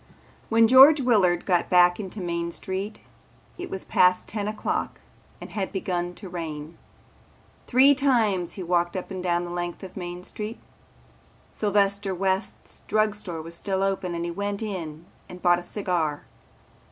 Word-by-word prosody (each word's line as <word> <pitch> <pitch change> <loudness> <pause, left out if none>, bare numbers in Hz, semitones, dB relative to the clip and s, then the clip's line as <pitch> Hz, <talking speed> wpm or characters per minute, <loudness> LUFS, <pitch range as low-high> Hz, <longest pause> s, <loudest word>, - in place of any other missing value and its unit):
When 225 0 +5
George 270 +5 +8
Willard 200 -9 +2
got 180 -3 +1
back 180 0 +5
into 200 0 -6
Main 170 -1 -2
Street 195 +4 -5 0.6
it 360 - -5
was 190 - -3
past 180 0 +3
ten 205 -2 -3
o'clock 215 0 -3 0.4
and - - -10
had 195 -3 -3
begun 180 -2 -3
to 200 - -9
rain. 160 -2 -6 0.9
Three 265 +3 +6
times 225 -11 +1
he 190 - -6
walked 175 0 0
up 185 - -6
and 185 -1 -4
down 175 -1 0
the 175 - -7
length 175 +1 -4
of 185 - -9
Main 175 -1 -6
Street. 215 +4 -6 1.0
Sylvester 200 -1 +1
West's 190 +2 -3
Drug 215 -1 +2
Store 175 -6 -7
was 165 +1 -5
still 190 +2 -1
open 190 -2 -1
and 170 0 -3
he 170 - -3
went 200 +3 -3
in 170 -6 -6 0.2
and 180 - -9
bought 175 -1 +3
a - - -9
cigar. 175 -6 -2
185 Hz, 160 wpm, -25 LUFS, 175-210 Hz, 1.0 s, George